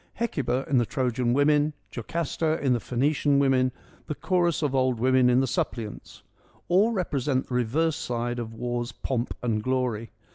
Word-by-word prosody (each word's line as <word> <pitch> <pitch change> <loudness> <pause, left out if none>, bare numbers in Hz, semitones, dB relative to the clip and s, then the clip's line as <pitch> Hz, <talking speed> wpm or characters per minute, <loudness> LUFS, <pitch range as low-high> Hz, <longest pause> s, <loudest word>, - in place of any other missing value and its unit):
Hecuba 135 - -1
in 135 -3 +3
the 120 - +2
Trojan 125 -2 0
Women, 145 +3 +3 0.2
Jocasta 160 +5 -2
in 135 -3 +2
the 120 - +1
Phoenician 140 +4 +1
Women, 130 -2 +3 0.4
the 150 - -3
chorus 170 +1 +1
of 145 -2 0
old 130 -3 +1
women 130 0 +4
in 125 +1 +4
the - - +2
Suppliants: 115 -3 -4 0.5
all 200 +6 +4
represent 140 - -1
the - - -5
reverse 140 +6 +1
side 120 0 -3
of 115 -1 -5
war's 120 +1 -3
pomp 120 +1 -3
and 110 -3 0
glory. 125 -2 -1
130 Hz, 160 wpm, -26 LUFS, 120-150 Hz, 0.5 s, women